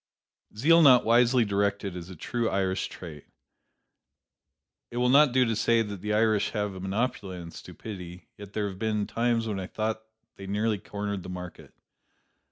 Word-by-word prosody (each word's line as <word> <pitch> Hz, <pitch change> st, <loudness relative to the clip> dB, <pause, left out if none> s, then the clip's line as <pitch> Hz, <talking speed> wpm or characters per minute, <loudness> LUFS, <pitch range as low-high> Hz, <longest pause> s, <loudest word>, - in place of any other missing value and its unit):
Zeal 165 Hz, +8 st, +5 dB
not 130 Hz, -5 st, +7 dB
wisely 120 Hz, +1 st, +4 dB
directed 100 Hz, -1 st, -1 dB
is 90 Hz, 0 st, -7 dB
a 95 Hz, -, -9 dB
true 115 Hz, +7 st, -2 dB
Irish 95 Hz, -1 st, -1 dB
trait. 80 Hz, -5 st, -10 dB, 1.6 s
It 120 Hz, -, -7 dB
will 125 Hz, 0 st, +2 dB
not 140 Hz, +1 st, +6 dB
do 130 Hz, 0 st, +3 dB
to 115 Hz, -1 st, 0 dB
say 115 Hz, +1 st, +2 dB
that 100 Hz, -3 st, -7 dB
the 105 Hz, +1 st, -3 dB
Irish 110 Hz, -1 st, +2 dB
have 105 Hz, -1 st, -2 dB
a 95 Hz, -, -8 dB
monopoly 95 Hz, -1 st, -2 dB
on 85 Hz, -1 st, -8 dB
stupidity, 90 Hz, -4 st, -9 dB
yet 100 Hz, -1 st, -11 dB
there 105 Hz, -1 st, -1 dB
have 95 Hz, -1 st, -8 dB
been 105 Hz, -2 st, 0 dB
times 115 Hz, 0 st, 0 dB
when 105 Hz, -3 st, -2 dB
I 95 Hz, -, -5 dB
thought 110 Hz, +1 st, -3 dB, 0.4 s
they 95 Hz, -, -9 dB
nearly 105 Hz, +1 st, 0 dB
cornered 100 Hz, 0 st, -4 dB
the 90 Hz, -, -9 dB
market. 90 Hz, -1 st, -9 dB
105 Hz, 175 wpm, -27 LUFS, 95-115 Hz, 1.6 s, not